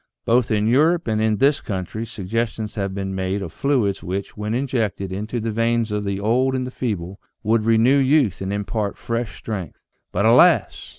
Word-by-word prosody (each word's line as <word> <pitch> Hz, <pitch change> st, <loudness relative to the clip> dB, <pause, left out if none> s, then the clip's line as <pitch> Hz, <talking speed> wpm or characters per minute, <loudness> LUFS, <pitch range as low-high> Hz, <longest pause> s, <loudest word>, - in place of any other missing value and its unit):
Both 120 Hz, 0 st, +3 dB
in 105 Hz, -1 st, +1 dB
Europe 155 Hz, +8 st, +3 dB
and 110 Hz, -1 st, 0 dB
in 110 Hz, -1 st, +2 dB
this 140 Hz, +4 st, +3 dB
country 105 Hz, +3 st, -4 dB
suggestions 110 Hz, +2 st, -3 dB
have 100 Hz, -2 st, -3 dB
been 95 Hz, -1 st, -3 dB
made 95 Hz, +1 st, -2 dB
of 85 Hz, -4 st, -7 dB
fluids 125 Hz, -9 st, 0 dB
which, 95 Hz, +2 st, -4 dB
when 105 Hz, +1 st, -3 dB
injected 115 Hz, -7 st, -1 dB
into 105 Hz, +5 st, -3 dB
the 115 Hz, 0 st, -2 dB
veins 115 Hz, 0 st, 0 dB
of 105 Hz, 0 st, -2 dB
the 100 Hz, 0 st, -2 dB
old 125 Hz, +6 st, +1 dB
and 130 Hz, -1 st, -1 dB
the 125 Hz, -, -6 dB
feeble, 100 Hz, -7 st, -4 dB, 0.2 s
would 110 Hz, 0 st, +2 dB
renew 115 Hz, +5 st, +4 dB
youth 135 Hz, -, +2 dB
and 95 Hz, 0 st, -3 dB
impart 100 Hz, +1 st, -2 dB
fresh 115 Hz, -1 st, -3 dB
strength. 100 Hz, -6 st, -6 dB, 0.3 s
But 100 Hz, +4 st, 0 dB
alas 115 Hz, +3 st, +4 dB
110 Hz, 185 wpm, -22 LUFS, 100-120 Hz, 0.3 s, renew